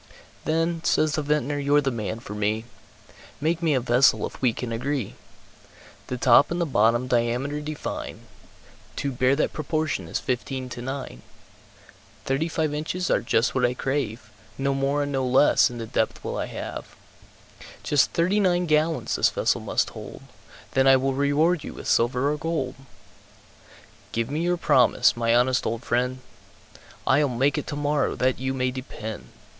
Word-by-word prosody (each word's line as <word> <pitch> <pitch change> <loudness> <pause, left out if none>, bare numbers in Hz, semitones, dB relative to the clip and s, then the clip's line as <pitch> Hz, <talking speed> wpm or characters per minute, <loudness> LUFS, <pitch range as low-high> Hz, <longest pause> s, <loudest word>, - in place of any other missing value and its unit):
"Then," 165 +1 0
says 155 0 +2
the 155 - -1
Vintner, 145 -1 0
"you're 145 +1 +3
the 135 -2 0
man 110 -2 -4
for 105 - -8
me, 105 +2 -1 0.7
Make 160 +3 0
me 160 -4 +2
a - - +3
vessel, 125 +2 +3
if - - -9
we 125 -3 +3
can 115 +1 -5
agree. 125 0 -2 0.9
The 125 - -3
top 125 +3 +5
and 175 - -2
the 170 - +1
bottom 120 -3 +2
diameter 125 +4 0
define, 150 0 -5 0.7
To 140 - -2
bear 130 +1 +2
that 150 - 0
proportion 155 - -2
as - - -2
fifteen 130 +1 -3
to 125 -1 -7
nine, 130 - -6 1.0
Thirty 135 +5 0
five 160 -2 -1
inches 170 +4 -2
are - - +3
just 115 +1 +1
what 130 - 0
I 125 0 +2
crave, 120 -6 -3 0.3
No 140 0 0
more 135 +2 0
and 145 - -4
no 135 -1 0
less, 130 +2 +4
in 120 - -8
the 115 - -5
depth, - - -1
will - - -4
I - - -2
have; - - -7 0.9
Just 145 -3 +3
thirty 185 +5 +1
nine 180 -3 +2
gallons 155 0 +1
this - - +4
vessel - - 0
must - - -1
hold, - - -10 0.5
Then 135 0 +3
I 135 0 +7
will 135 +1 0
reward 145 +4 +2
you - - -8
with - - -8
silver 125 +4 +2
or 150 - -2
gold, 150 -5 -2 1.4
Give 115 +3 -1
me 155 +3 -1
your 175 +1 +1
promise, 125 -7 +4
my 115 0 +2
honest 125 +2 +2
old 115 +1 -3
friend?" 125 +2 -1 0.8
"I'll 140 +2 +3
make 135 +5 +1
it - - -7
tomorrow, 145 0 0
that 130 0 0
you 130 +1 -2
may 130 -1 0
depend!" 110 - -7
135 Hz, 170 wpm, -25 LUFS, 125-150 Hz, 1.4 s, I